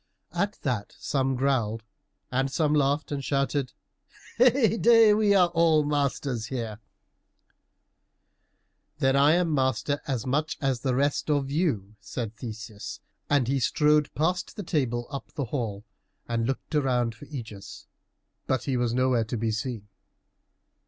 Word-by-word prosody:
At 200 +1 0
that 120 -7 -2
some 135 -1 0
growled, 120 -4 0 0.5
and 135 +2 0
some 150 0 +1
laughed 145 +1 +1
and 140 -1 -3
shouted, 140 -1 -1 0.7
"Heyday! 230 -3 +5
we 210 -1 +3
are 180 -3 +5
all 165 -2 +3
masters 140 -5 -1
here." 115 -5 -4 2.2
"Then 135 0 +2
I 140 +3 +5
am 170 -2 +2
master 130 0 0
as 130 -5 -2
much 150 +4 -1
as 135 -3 0
the 130 0 0
rest 140 +3 0
of 140 -2 +1
you," 110 - -1
said 115 -3 -5
Theseus, 110 -3 -7 0.3
and 140 -4 +3
he 135 +1 +1
strode 150 +5 +3
past 180 +4 -1
the 205 - -5
table 125 -8 -1
up 140 - -6
the 140 - -2
hall, 110 -5 -3 0.4
and 115 -1 -1
looked 135 +4 -4
around 125 -5 +1
for 125 +6 -13
Ægeus, 115 -9 -8 0.6
but 130 -2 0
he 135 -3 -1
was 120 -1 0
nowhere 130 -3 +2
to 115 +2 -3
be 110 0 0
seen. 110 -1 -4
135 Hz, 140 wpm, -27 LUFS, 120-150 Hz, 2.2 s, Heyday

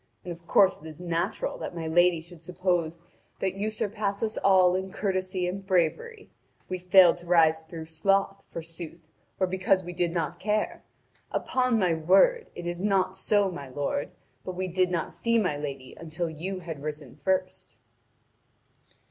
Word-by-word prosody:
And 180 - -5
of 170 0 -10
course 195 -5 +4
it 160 - -10
is 155 0 -10
natural 170 -1 -2
that - - -6
my 165 -1 -4
lady 175 +1 +3
should 170 0 -14
suppose 175 -1 -1 0.4
that 190 -1 0
you 200 +3 -2
surpass 210 -1 -2
us 220 0 -1
all 185 -2 +5
in 190 +1 -2
courtesy 185 -2 -1
and 195 +2 -4
bravery. 195 - -1 0.4
We 185 - -3
failed 180 -1 +6
to 175 0 -12
rise 160 -2 +5
through 160 0 -8
sloth, 195 +5 0
forsooth, 165 0 -9 0.3
or 190 - +3
because 185 +1 +1
we 175 0 -7
did 175 -1 0
not 170 0 -2
care! 210 +2 -1 0.5
Upon 255 -2 +1
my 185 -5 +2
word, 195 - +4
it 175 - -7
is 175 0 -3
not 190 -2 +1
so, 200 -1 +2
my 140 -6 -8
lord; 145 +1 -2 0.3
but 185 - -5
we 185 +1 -2
did 185 0 +1
not 170 -3 -2
see 230 0 +1
my 185 -9 +1
lady 140 -3 -6
until 165 +1 -4
you 185 +4 -5
had 160 -4 -7
risen 150 -3 -6
first." 185 - -2
180 Hz, 170 wpm, -27 LUFS, 165-190 Hz, 0.5 s, failed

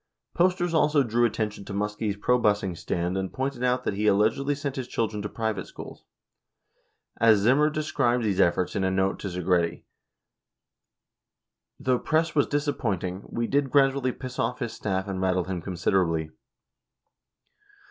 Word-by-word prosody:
Posters 175 -1 +1
also 150 -2 +3
drew 120 0 +2
attention 105 -3 -2
to 100 - -6
Muskie's 105 0 -2
probusing 105 -5 +1
stand 85 +2 -2
and 95 -1 -2
pointed 130 -1 -3
out 125 0 +1
that - - -1
he 105 +2 0
allegedly 110 +8 +2
sent 140 -1 -4
his 130 -3 -4
children 110 -4 -2
to 105 - -4
private 110 -5 -3
schools. - - -11 1.1
17 115 - +5
As 110 - +7
Zimmer 135 +8 +4
described 135 -6 0
these 100 -4 0
efforts 90 +2 +2
in 100 - 0
a 95 - +2
note 95 +1 0
to - - -5
Segretti, 90 -2 0 2.0
"Though 130 -3 +1
press 160 +1 +1
was 145 - +2
disappointing... 105 - -2
we 115 - -2
did 140 +2 +1
grandly 135 -1 +3
piss 125 0 -8
off 125 - 0
his 115 - -4
staff 95 -1 -2
and 95 -1 -3
rattle 95 -1 +1
him 90 -1 -4
considerably." 85 -3 0
110 Hz, 155 wpm, -26 LUFS, 95-135 Hz, 2.0 s, As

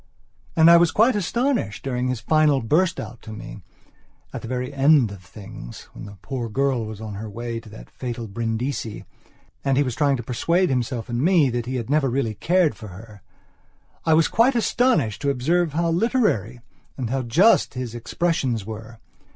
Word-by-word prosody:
And 160 +1 +7
I 170 - +9
was 170 0 +4
quite 225 +6 +3
astonished, 225 - -1
during 125 -2 -2
his 125 -2 -2
final 150 +3 +3
burst 170 +9 +1
out 120 - -8
to 110 - -10
meat 110 -1 -9 0.7
the - - -6
very 125 +2 -3
end 140 -4 +4
of 100 -2 -10
things, 95 - -11
when - - -9
the 100 0 -11
poor 125 -4 -4
girl 130 -1 0
was 110 -1 -8
on 110 -1 -7
her 105 +2 -6
way 115 +2 -5
to 115 - -14
that 110 - -13
fatal 120 -2 -5
Brindisi 115 +2 -3 0.6
and 135 -1 +1
he 145 - +4
was 125 -3 -3
trying 140 0 +1
to 120 - -6
persuade 170 +10 +1
himself 125 -2 -2
and 120 0 -2
me 165 -5 +4
that 120 0 -3
he 130 - -3
had 120 -3 -3
never 145 -3 +2
really 120 -3 -1
cared 175 - +2
for 105 0 -12 0.9
herI 160 - +5
was 160 0 +4
quite 245 +4 +3
astonished 235 - +1
to 140 - 0
observe 155 +5 +1
how 165 +1 0
literary 165 - 0 0.4
and 125 -4 -3
how 135 0 0
just 145 - +3
his 125 -3 -4
expressions 125 - -1
were. 110 +1 -8
125 Hz, 185 wpm, -23 LUFS, 115-160 Hz, 0.9 s, I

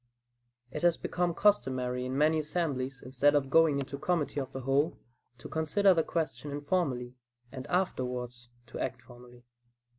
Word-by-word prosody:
It 150 - -5
has 175 -1 +3
become 175 -1 -1
customary 130 -10 +1
in 130 +1 -3
many 155 +2 +3
assemblies, 140 -5 -2
instead 135 +3 +3
of 135 -2 +1
going 160 -3 +5
into 140 0 -4
committee 150 -3 0
of 135 -1 -4
the 135 - -6
whole, 140 +5 +1 0.4
to - - -9
consider 170 +5 +3
the 165 - +2
question 160 -2 -3
"informally," 145 -4 -1 0.4
and 130 -1 -7
afterwards 125 -9 -2 0.2
to 120 - -8
act 120 - -3
"formally." 120 0 -15
140 Hz, 150 wpm, -30 LUFS, 125-160 Hz, 0.4 s, going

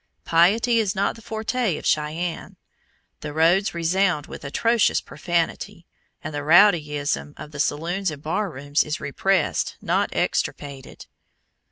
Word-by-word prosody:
Piety 215 +8 +3
is 205 -2 0
not 200 0 0
the 230 - -13
forte 220 -3 -2
of - - -9
Cheyenne. 160 +3 -2 0.6
The 150 -1 -6
roads 170 +5 +3
resound 170 -2 +1
with - - -10
atrocious 225 +11 +2
profanity, 175 +1 -3 0.4
and 155 - -5
the 145 - -3
rowdyism 150 -4 +3
of 150 - -9
the 150 - -9
saloons 170 +7 -1
and 150 -2 -8
bar 195 +6 -1
rooms 145 0 0
is 150 0 -4
repressed, 165 +5 0
not - - 0
extirpated. 140 -2 -3
170 Hz, 135 wpm, -23 LUFS, 150-195 Hz, 0.6 s, Piety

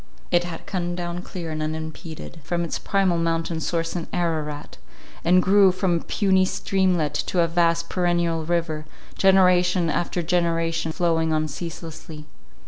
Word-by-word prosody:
It 175 -1 +3
had 165 -2 -7
come 175 -2 -2
down 175 0 -4
clear 175 -3 -6
and 155 0 -3
unimpeded 160 +1 -6
from 170 +3 -1
its 170 - -3
primal 190 -4 +1
mountain 165 0 -1
source 165 +1 -2
in 170 - -3
Ararat, 155 -4 -3 0.5
and 180 +2 +4
grew 195 0 +6
from 185 -1 0
a - - -6
puny 190 -3 +2
streamlet 185 -5 0
to 180 - +1
a 170 - +3
vast 170 0 +1
perennial 170 -2 0
river, 160 -2 -2 0.3
generation 180 -3 +4
after 175 +1 -1
generation 165 -1 0
flowing 165 -2 +1
on 155 0 +1
ceaselessly. 160 0 -8
170 Hz, 145 wpm, -24 LUFS, 160-180 Hz, 0.5 s, grew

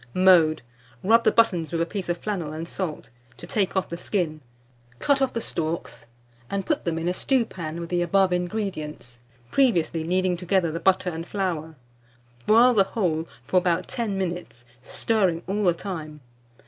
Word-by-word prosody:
Mode. 175 -6 +5 0.4
Rub 230 +4 +5
the 215 - +4
buttons 180 -10 +2
with 165 - -1
a 165 - +2
piece 190 0 -5
of 175 - 0
flannel 175 -7 -3
and 160 +2 -5
salt, 170 -5 -5 0.3
to - - -9
take 195 -2 0
off 190 - +1
the 170 - -6
skin; 160 -6 -2 0.6
cut 275 - +2
off 270 - +2
the 230 - -3
stalks, 165 - -4 0.4
and 200 -1 -2
put 310 - -1
them 165 -2 -1
in 165 +1 -2
a 180 - +1
stewpan 185 - -1
with 170 -1 -6
the 175 -1 +1
above 185 +2 +3
ingredients, 175 - -4 0.3
previously 170 -11 +2
kneading 180 +1 +1
together 180 -1 +1
the 165 - -3
butter 185 0 +2
and 165 +1 -6
flour; 165 -5 -3 0.7
boil 235 +3 +6
the 205 -4 +5
whole 170 -6 -1 0.2
for 185 - +1
about 180 0 +1
ten 225 -5 -2
minutes, 170 -11 -4 0.2
stirring 185 - 0
all 205 +2 -1
the 175 - +6
time. 155 -6 -6
180 Hz, 175 wpm, -25 LUFS, 165-200 Hz, 0.7 s, boil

